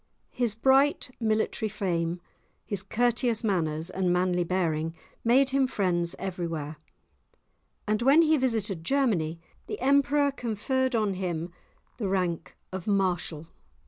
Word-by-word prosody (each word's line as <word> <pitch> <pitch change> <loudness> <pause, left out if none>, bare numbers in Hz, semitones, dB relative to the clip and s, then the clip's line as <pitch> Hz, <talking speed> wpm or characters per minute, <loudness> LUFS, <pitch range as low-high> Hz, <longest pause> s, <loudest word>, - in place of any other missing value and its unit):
His 240 -4 0
bright 265 +3 +3
military 220 -1 0
fame, 175 -4 -2 0.4
his 200 -3 -3
courteous 235 +2 0
manners, 165 -6 -1
and 185 -1 0
manly 180 0 +2
bearing 165 -2 -1 0.3
made 260 +3 +4
him 270 -1 +3
friends 175 -7 0
everywhere, 165 -5 -4 1.1
and 215 +1 +1
when 280 +7 +6
he 315 0 +4
visited 220 - -1
Germany 175 - +1 0.3
the 425 - -5
Emperor 280 +1 +3
conferred 255 +1 -1
on 215 -3 +1
him 175 -2 -3 0.5
the 215 -5 -2
rank 180 -3 -2
of 190 0 -6
Marshal. 180 -6 0
200 Hz, 120 wpm, -27 LUFS, 175-245 Hz, 1.1 s, when